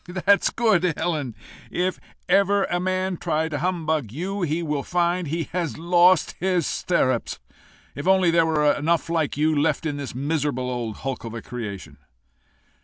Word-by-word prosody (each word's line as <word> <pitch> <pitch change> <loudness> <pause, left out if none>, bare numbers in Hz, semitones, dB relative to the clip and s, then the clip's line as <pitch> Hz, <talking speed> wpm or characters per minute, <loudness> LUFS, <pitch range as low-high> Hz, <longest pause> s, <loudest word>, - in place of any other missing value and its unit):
"That's 200 0 +5
good, 185 -8 +2
Helen! 145 -9 -2 0.3
If 180 +1 -1 0.3
ever 200 0 +3
man 185 0 -1
try 160 +1 -1
to 145 -2 -3
humbug 160 - -1
you, 190 - -4
he 170 0 -1
will 150 -3 -1
find 175 +2 0
he 165 +3 -1
has 170 -3 -2
lost 175 +1 +4
his 180 -3 +1
stirrups. 130 -9 0 0.6
If 145 +5 -6
only 190 -2 +4
there 165 -1 +3
were 150 -2 +3
enough 165 +3 0
like 160 -4 0
you 155 +1 +2
left 150 +3 +1
in 145 -2 -2
this 140 -4 -6
miserable 140 -2 -1
old 120 -4 -3
hulk 135 -1 -3
of 115 0 -6
a 115 - -5
creation!" 100 - -7
160 Hz, 160 wpm, -24 LUFS, 145-180 Hz, 0.6 s, That's